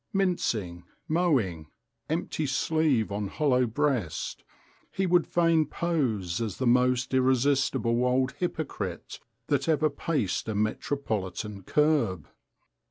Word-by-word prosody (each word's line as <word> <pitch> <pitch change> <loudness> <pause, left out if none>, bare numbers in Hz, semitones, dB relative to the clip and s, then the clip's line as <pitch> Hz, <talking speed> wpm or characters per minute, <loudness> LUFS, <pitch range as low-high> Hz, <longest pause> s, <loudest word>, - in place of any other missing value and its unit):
Mincing, 115 - -1 0.2
mowing, 130 - +1 0.4
empty 155 -1 -2
sleeve 135 -5 +1
on 100 0 -2
hollow 130 0 +1
breast, 120 - -1 0.5
he 195 - -1
would 175 -1 +3
fain 165 -3 +3
pose 125 - -1
as 110 -5 -3
the 130 - -2
most 125 +1 +2
irresistible 130 -2 +2
old 130 +1 +2
hypocrite 135 - -4 0.3
that 140 +1 0
ever 155 -1 +2
paced 140 - -2
a 110 - -2
metropolitan 105 -3 -2
kerb. 135 - +1
130 Hz, 105 wpm, -27 LUFS, 105-155 Hz, 0.5 s, would